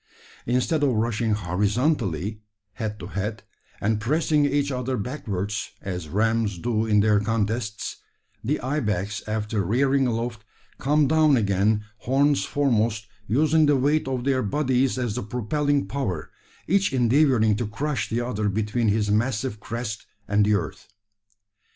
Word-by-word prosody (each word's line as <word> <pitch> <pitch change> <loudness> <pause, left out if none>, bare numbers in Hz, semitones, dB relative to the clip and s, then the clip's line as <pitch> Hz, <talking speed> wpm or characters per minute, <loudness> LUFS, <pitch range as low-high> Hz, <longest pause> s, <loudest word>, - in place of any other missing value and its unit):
Instead 125 +6 +1
of 140 -3 +3
rushing 110 0 0
horizontally, 105 - 0 0.3
head 110 -2 -4
to 90 - -7
head, 105 +3 -4 0.4
and 105 +1 0
pressing 150 +3 +2
each 145 0 0
other 130 0 -2
backwards, 105 -4 -4
as 90 -5 -5
rams 110 +1 +1
do 110 +4 -1
in 105 -1 +4
their 105 -1 +4
contests, 110 0 -2 0.5
the 140 +7 0
ibex 105 -7 -1
after 105 0 -1
rearing 135 +7 +2
aloft, 115 -2 -3 0.4
come 150 +1 +3
down 155 -2 +4
again, 105 0 +2
horns 140 +5 +2
foremost, 115 -6 +1 0.2
using 155 +6 +3
the 145 -1 +4
weight 145 +3 +1
of 130 -2 -2
their 130 -1 +1
bodies 130 +2 +1
as 120 -4 -1
the 125 - -3
propelling 140 +6 0
power, 105 - -3 0.4
each 195 -1 +2
endeavouring 125 -3 +3
to 115 0 -2
crush 135 +7 -2
the 115 +2 0
other 110 -4 -1
between 110 +3 0
his 105 0 +1
massive 110 +1 0
crest 115 0 -5 0.2
and 100 0 +3
the 105 0 +3
earth. 100 - -4
115 Hz, 140 wpm, -24 LUFS, 105-135 Hz, 0.5 s, in